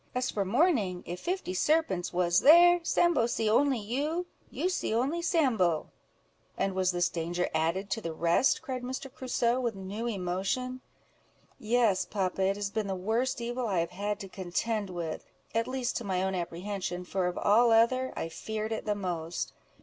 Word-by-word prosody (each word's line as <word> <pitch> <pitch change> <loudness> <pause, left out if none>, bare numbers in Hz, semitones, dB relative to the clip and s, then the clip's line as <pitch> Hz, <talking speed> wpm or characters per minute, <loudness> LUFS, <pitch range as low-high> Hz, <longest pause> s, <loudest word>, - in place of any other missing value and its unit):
As 250 0 0
for 200 - 0
morning, 205 - +1
if 175 +1 -5
fifty 360 - -3
serpents 245 - +1
was 175 0 +3
there, 350 +3 +7
Sambo 335 -7 +2
see 225 -2 -1
only 265 +5 +3
you—you 295 - -3
see 360 -11 -1
only 280 +9 0
Sambo." 240 - +1 0.7
"And 195 0 0
was 185 -1 +1
this 175 -1 +1
danger 175 +1 -2
added 170 +5 0
to 225 - -1
the 165 - -4
rest?" 170 - +2
cried 260 -5 -4
Mr. 260 +1 -6
Crusoe, 250 -2 0
with 235 -4 -1
new 200 +4 -5
emotion. 210 +6 -2 0.8
"Yes, 220 -4 +2
papa; 190 -2 -2
it 195 +1 +2
has 200 -1 -3
been 220 -2 -2
the 190 - -2
worst 230 +7 -1
evil 240 +1 -2
I 195 -4 0
have 170 - -3
had 205 +3 -3
to 195 - -6
contend 195 +3 -2
with, 170 -3 -4 0.3
at 230 0 0
least 255 -1 -2
to 240 - -4
my 190 -3 -1
own 190 0 -1
apprehension, 180 +1 -4
for 185 0 -1
of 180 - -3
all 230 +4 +4
other, 235 +3 +3
I - - -3
feared 215 +6 -4
it 220 - -3
the 210 -1 0
most. 175 -4 -3
210 Hz, 175 wpm, -29 LUFS, 185-255 Hz, 0.8 s, there